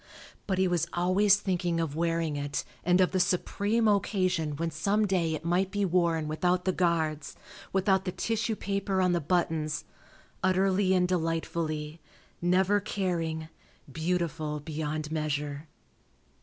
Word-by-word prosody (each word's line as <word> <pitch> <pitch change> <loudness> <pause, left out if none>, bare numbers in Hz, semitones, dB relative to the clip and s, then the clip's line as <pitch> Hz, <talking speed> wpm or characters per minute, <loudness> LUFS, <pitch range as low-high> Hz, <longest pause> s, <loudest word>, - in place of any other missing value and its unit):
But 190 -2 0
he 190 0 +3
was 175 -2 0
always 185 +3 +4
thinking 180 -4 -1
of 160 -3 -2
wearing 165 -2 0
it 145 0 -2 0.2
and 180 +1 +3
of 185 - +4
the 185 - +1
supreme 205 +5 +1
occasion 185 -6 +1
when 165 +2 -2
some 200 +7 +1
day 175 -5 +1
it 160 - -8
might 180 +3 +1
be 205 0 0
worn 170 -3 +1
without 180 +4 0
the 190 - +3
guards, 160 -5 0 0.4
without 190 0 +2
the 180 - -1
tissue 225 +2 -1
paper 195 -1 -1
on 180 -1 +3
the 175 -1 +1
buttons, 160 -2 0 0.6
utterly 190 0 +2
and 180 -1 +3
delightfully, 165 -2 -2 0.4
never 185 +3 +3
caring, 170 -6 -2 0.4
beautiful 160 -2 -1
beyond 155 0 -4
measure. 150 -1 -2
175 Hz, 140 wpm, -29 LUFS, 160-190 Hz, 0.6 s, always